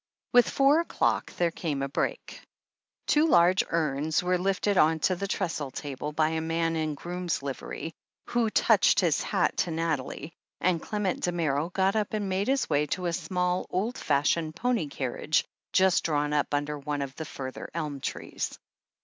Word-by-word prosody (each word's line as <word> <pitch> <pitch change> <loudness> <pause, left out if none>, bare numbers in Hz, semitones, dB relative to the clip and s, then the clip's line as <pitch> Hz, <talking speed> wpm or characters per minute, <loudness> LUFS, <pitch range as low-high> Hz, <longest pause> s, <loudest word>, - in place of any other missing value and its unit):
With 245 -1 +6
four 280 +3 +4
o'clock 335 - 0
there 170 -1 +1
came 150 -5 -3
a - - -1
break. 140 - -3 0.6
Two 300 +2 +4
large 180 - +5
urns 155 0 0
were 180 0 +1
lifted 195 +2 +1
on 160 -2 +4
to 185 - +2
the 200 +3 -3
trestle 165 -8 -2
table 145 +2 -5
by 155 +1 +2
a 160 0 -1
man 165 0 0
in 155 -2 -1
groom's 175 -1 -3
livery, 140 +4 -5 0.3
who 235 -2 +1
touched - - +4
his - - +2
hat - - 0
to - - +1
Nathalie, 160 -1 -3 0.3
and 175 -2 +1
Clement 210 -4 -2
Damerel 165 -3 0
got 190 +3 +1
up 215 -1 -1
and 205 -2 -2
made 190 +2 0
his 270 0 +1
way 150 0 +1
to 180 +5 -2
a 170 - 0
small, 180 +1 -1
old 215 +7 -1
fashioned 155 +2 +1
pony 235 -4 0
carriage 140 +2 -1 0.3
just 190 -1 +4
drawn 150 -2 0
up 145 -1 +1
under 145 0 -1
one 145 0 -2
of 135 0 -7
the 160 - -5
further 130 -2 -7
elm 150 -4 -3
trees. - - -4
165 Hz, 175 wpm, -28 LUFS, 150-185 Hz, 0.6 s, With